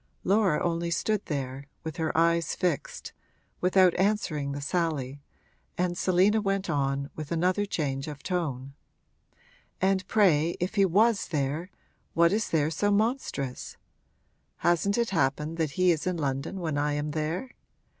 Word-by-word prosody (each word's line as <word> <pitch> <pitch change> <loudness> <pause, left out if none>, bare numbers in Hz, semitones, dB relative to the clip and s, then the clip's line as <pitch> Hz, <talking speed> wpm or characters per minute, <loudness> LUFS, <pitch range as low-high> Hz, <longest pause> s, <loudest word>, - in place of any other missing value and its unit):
Laura 195 -5 +3
only 170 0 -1
stood 210 +4 0
there, 135 -2 -4 0.2
with 160 -3 -6
her 160 -1 -1
eyes 170 0 +2
fixed, 180 -6 -2 0.5
without 185 -1 +4
answering 185 -8 0
the 140 - -4
sally, 145 -4 -2 0.6
and 180 0 0
Selina 190 +5 +3
went 195 -1 -1
on, 140 0 -1
with 155 0 -7
another 185 +5 +1
change 140 -5 -2
of 145 -2 -8
tone: 140 -8 -3 1.1
'And 190 0 +1
pray 170 -6 +3
if 180 +3 -2
he 200 -2 +4
was 210 +4 +3
there, 150 +3 -2 0.5
what 170 +2 +4
is 220 +2 0
there 155 -1 +1
so 205 +6 0
monstrous? 205 - -1 0.9
Hasn't 175 +5 +2
it 235 -4 0
happened 150 0 0
that 155 -4 -1
he 185 -1 +5
is 160 0 -1
in 180 -1 0
London 140 +5 -2
when 155 -4 -1
I 145 0 0
am 145 +1 -2
there? 160 - -3
170 Hz, 145 wpm, -28 LUFS, 145-190 Hz, 1.1 s, he